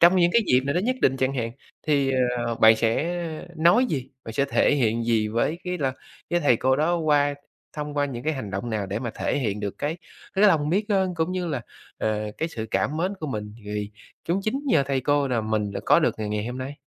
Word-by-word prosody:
trong 175 +2 +7
những 175 -1 +4
cái 235 - +5
dịp 125 +1 +4
nào 140 +3 -2
nó 175 - +2
nhất 255 +5 0
định 135 0 +4
chẳng 130 +1 0
hạn, 115 -3 -2 0.4
thì, 140 -3 +2 0.4
ờ, 115 - -1
bạn 110 0 +6
sẽ 145 +11 0 0.4
nói 175 +11 +5
gì? 135 -3 -3
Bạn 115 - -6
sẽ 140 +4 +1
thể 140 - +2
hiện 115 -3 +1
gì 110 -2 +1
với 120 +9 0
cái 180 -1 -2
là 135 -3 0 0.4
cái 175 0 +2
thầy 125 -6 +4
cô 130 +2 +2
đó 165 +4 +2
qua 145 -3 +2 0.4
thông 150 0 -4
qua 145 - +3
những 125 -4 -5
cái 155 - +1
hành 120 -8 -5
động 100 +5 -4
nào 105 -2 -2
để 100 +3 -3
mà 120 -2 -4
thể - - -1
hiện 105 -5 -2
được 100 -2 -4
cái 155 +4 -2 0.4
cái 200 +2 +4
lòng 150 -5 +2
biết 205 +4 0
ơn, 190 -3 +1
cũng 165 +2 -1
như 180 -1 -2
là, 140 -7 -2 0.4
ờ, 105 -1 -1
cái 160 - -1
sự 110 -7 -5
cảm 150 - 0
mến 185 +5 -1
của 155 - -3
mình 105 -5 -5
vì 105 0 -4 0.4
cũng 180 +4 +1
chính 260 +7 -1
nhờ 240 - +4
thầy 135 -1 0
cô 145 +1 +1
là 120 -3 +1
mình 110 -2 -1
đã - - -4
có - - +6
được - - +2
ngày 105 - -3
ngày 105 +1 -2
hôm 125 +1 -5
nay. 135 +3 -6
140 Hz, 250 wpm, -25 LUFS, 115-165 Hz, 0.4 s, trong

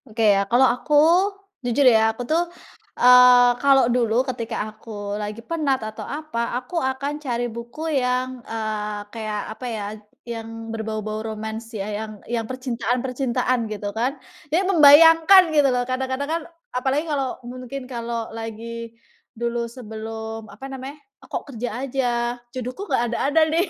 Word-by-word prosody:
Oke 220 -2 +3
ya, 195 0 0
kalau 245 +3 +5
aku, 260 +4 +1 0.7
jujur 245 +3 +1
ya 225 -3 +6
aku 225 +2 -4
tuh, 320 +7 +2 0.6
eee, 250 0 +8
kalau 275 -2 +5
dulu 240 0 +2
ketika 240 -4 -4 0.2
aku 205 -2 -7
lagi 210 +2 -6
penat 305 -5 0
atau 215 0 -7
apa, 245 -6 -3
aku 330 +7 -3
akan 275 +3 -2
cari 245 -4 -2
buku 235 +7 -7 0.2
yang, 250 0 -1
eee, 215 -2 -4
kayak 215 -2 -3
apa 250 - -9
ya, 215 -3 -4 0.4
yang 225 -1 -6
berbau-bau 215 -1 -4
romance 220 +1 -6
ya, 195 - -3
yang 215 0 -5
yang 230 -2 -3
percintaan-percintaan, 250 -1 -1
gitu 205 -1 -4
kan. 250 +6 -1 0.3
Ya 340 +6 +2
membayangkan 330 +1 +7
gitu 290 -3 +5
loh, 250 -1 +1
kadang-kadang 260 +2 -2
kan 335 - -1 0.3
apalagi 265 +5 0
kalau 275 -5 -2
mungkin 255 +2 -7
kalau 235 -2 -4
lagi 230 +1 -7 0.4
dulu 235 0 -2
sebelum, 220 -1 -7
apa 210 +7 -10
namanya, 270 +2 -7 0.2
kok 265 - -5
kerja 240 +1 -3 0.2
aja, 265 -1 0 0.4
jodohku 255 - -6
nggak 235 - +2
ada-ada 290 +6 +2
nih, 345 +4 +2
245 Hz, 145 wpm, -23 LUFS, 225-265 Hz, 0.7 s, eee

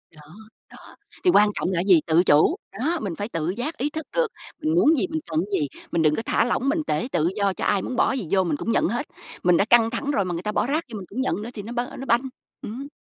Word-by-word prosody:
Đó. 155 - -15 0.5
Đó. - - -15 0.3
Thì 365 - +4
quan 210 -6 +5
trọng - - -1
là - - -1
cái 180 - -1
gì? 180 -6 +6
Tự 165 +2 +4
chủ. 155 - +4 0.2
Đó, 325 +6 0
mình 185 -5 -3
phải 205 +1 -4
tự 165 -2 -2
giác 265 - -4
ý 285 +3 -1
thức 315 +1 -6
được, - - +3 0.3
mình 310 +1 0
muốn 325 -3 +5
gì, 365 - 0
mình 315 -1 -3
cần 155 - +1
cái - - +1
gì, 145 - 0 0.2
mình 170 - +1
đừng 150 -1 +3
có - - -2
thả - - +2
lỏng 255 +2 0
mình 315 +2 +1
tể 150 +10 0
tự 165 0 +1
do 200 -2 +1
cho - - -4
ai 200 -2 +2
muốn 255 - -4
bỏ - - +3
cái 265 - -1
gì 185 - -6
vô 190 -1 +3
mình 155 -4 -1
cũng 230 - -2
nhận - - +2
hết. 240 +8 -2 0.4
Mình 175 -1 +4
đã 200 - +3
căng 230 -1 +5
thẳng 275 +5 -2
rồi 200 -8 +1
mà 175 - -3
người 170 - -4
ta 210 - -1
bỏ 235 - 0
rác 310 +4 0
vô - - -4
mình 190 - -7
cũng 255 +6 -3
nhận 210 - -1
nữa 230 - -6
thì 205 - -6
nó 225 +4 -8
b 240 - -7 0.2
nó 270 - -5
banh, 235 0 +3 0.4
ừm. 260 +6 -6
220 Hz, 305 wpm, -24 LUFS, 180-275 Hz, 0.5 s, gì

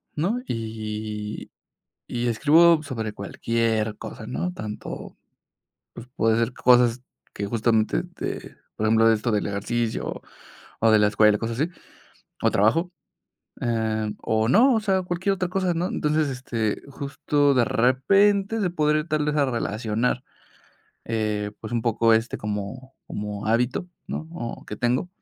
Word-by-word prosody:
¿no? 190 +11 0
Y 110 -2 -5 0.6
y 120 0 -2
escribo 155 +7 +5
sobre 115 -7 -4
cualquier 110 +1 -1
cosa, 110 - -8
¿no? 180 +9 -2
Tanto, 110 -12 -7 0.8
pues, 120 - -9
pueden 110 0 +2
ser 115 +2 0
cosas 125 -1 +4 0.3
que 100 0 -4
justamente 110 0 +1
te - - -6 0.2
por 110 - -2
ejemplo 115 +1 +5
esto 110 +2 0
del 105 -1 0
ejercicio, 110 +3 -2 0.6
o, 115 - +5
de 110 - +6
la 105 - +4
escuela, 105 0 +4
cosas 115 +3 -3
así, 165 - +1 0.7
o, - - +4
trabajo, 165 - +2 0.7
eh, 110 -2 0
o, 110 +1 +1
no. 250 - +6
O 220 - +3
sea, 190 -3 +1
cualquier 180 +3 0
otra 180 -1 -1
cosa, 185 -2 0
¿no? 170 +2 -1
Entonces, 150 -2 0
este, 120 -4 -2
justo 140 +1 +1
de 125 - +4
repente 195 - +3
se 185 - +1
podría 155 -2 +1
tal 155 -2 0
vez 150 0 0
a 140 - +4
relacionar, 115 0 -1 0.8
eh, 105 -2 -1
pues, 110 +2 -7
un 120 - +1
poco, 115 0 +3
este, 110 +2 +1
como 105 +6 -5
como 105 0 -5
hábito, 120 +9 +1 0.2
¿no 160 - -5
o 120 -9 -6
que 105 - -6
tengo? 125 +9 0
120 Hz, 145 wpm, -24 LUFS, 110-150 Hz, 0.8 s, de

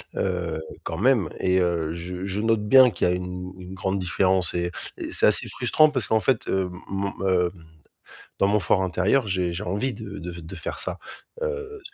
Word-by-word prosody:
heu, 85 -4 -2 0.2
quand 80 +1 -4
même 120 -7 +3
et 95 0 +2
heu, 85 -3 0
je 90 +2 -6
je 95 +1 -2
note 115 -1 +2
bien 130 +1 +8
qu'il - - 0
y - - +2
a - - +1
une 90 0 -5
une 90 0 -9
grande 95 0 -1
différence 95 -1 +1
et 85 0 -1 0.3
et - - -5
c'est - - +2
assez - - +3
frustrant 155 0 +4
parce 130 -8 -1
qu'en 110 - +2
fait, 120 +1 +1
hem, 95 -1 0 0.2
mon, 100 0 -2 0.2
hem, 90 -2 +3 0.9
dans 100 - +4
mon 105 +1 +3
fort 95 0 +2
intérieur 95 +7 +1
j'ai 90 -2 0
j'ai 85 +4 -4
envie 105 +8 -1
de 100 -2 -8
de 90 +1 -6
f 85 0 -9
de 80 - -9
faire - - -4
ça. - - -1 0.4
Heu, 445 -3 -4
95 Hz, 205 wpm, -25 LUFS, 90-105 Hz, 0.9 s, bien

